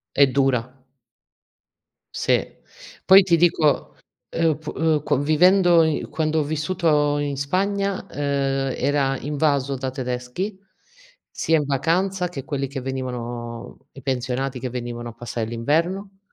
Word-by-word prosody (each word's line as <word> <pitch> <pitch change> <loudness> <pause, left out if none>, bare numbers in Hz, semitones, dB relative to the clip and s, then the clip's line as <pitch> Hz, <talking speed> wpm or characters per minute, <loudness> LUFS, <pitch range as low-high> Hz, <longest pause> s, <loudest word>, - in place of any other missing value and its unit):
È 140 - +7
dura. 130 -1 0 1.4
Sì. - - 0 0.5
Poi 190 +1 +9
ti 175 -2 +3
dico 160 -3 +2 0.3
ehm, 165 -1 +1
oppu 155 0 -3
uhm, 160 -3 +1
co - - +1
vivendo 175 +3 +5
i 160 -1 0
quando 160 0 0
ho - - +1
vissuto 150 -1 +1
in 145 -1 -2
Spagna, 195 +6 -1
ehm, 135 -2 -1
era 140 -2 +1
invaso 140 -2 0
da 130 0 -3
tedeschi, 125 +9 -4 0.7
sia 160 - +1
in 150 - -1
vacanza 180 +7 0
che 145 -7 -7
quelli 140 -3 -2
che 135 0 -6
venivano 120 -3 -5
i 135 - -12
pensionati 130 0 -2
che 130 - -4
venivano 120 -1 -5
a - - -10
passare 115 -1 -4
l'inverno, 165 - -1
145 Hz, 130 wpm, -23 LUFS, 130-165 Hz, 1.4 s, Poi